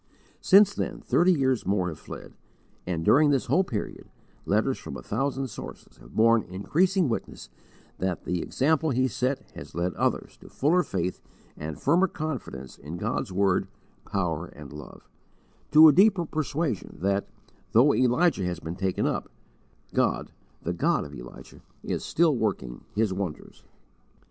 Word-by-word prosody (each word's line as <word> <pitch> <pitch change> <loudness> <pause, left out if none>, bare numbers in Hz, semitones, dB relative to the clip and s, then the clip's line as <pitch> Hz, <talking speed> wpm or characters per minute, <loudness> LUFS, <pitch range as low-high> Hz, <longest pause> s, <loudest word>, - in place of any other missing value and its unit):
Since 200 +1 +6
then - - -3
thirty 180 +2 +3
years 130 -7 +1
more 95 -1 0
have 80 - -8
fled, - - -10 0.5
and, 85 -3 -2
during 150 +2 +5
this 135 -3 +2
whole 190 - +3
period, 115 - -5 0.4
letters - - +1
from - - -7
a - - -10
thousand 135 +4 -1
sources - - -10
have - - -16
borne 115 +1 +5
increasing 170 - +1
witness 115 - -4 0.5
that 95 -3 -2
the 90 -1 -2
example 160 +3 +1
he 130 -1 +2
set 130 +2 -1
has - - -11
led 85 +1 -1
others - - -1
to - - -15
fuller 165 +6 +2
faith 90 - -3 0.3
and 75 0 -6
firmer 175 +7 +3
confidence 130 - -6
in 75 +5 -7
God's 90 - -2
word, 95 0 +2 0.4
power, 90 -4 -2
and 75 -2 -12
love; 75 - -11 0.6
to 155 +1 +9
a 150 - +7
deeper 190 0 +4
persuasion 155 - -3
that, 100 +1 +1 0.5
though 130 +6 +6
Elijah 130 - +2
has 90 -2 -3
been 80 +1 -6
taken 95 0 -1
up, - - -2 0.6
God, - - 0 0.3
the 85 - -1
God 85 - +1
of 70 - -10
Elijah, - - -11 0.2
is - - -3
still 165 -3 +2
working 95 - -3
His 105 -2 +1
wonders. 95 -5 -6
115 Hz, 155 wpm, -27 LUFS, -, 0.6 s, to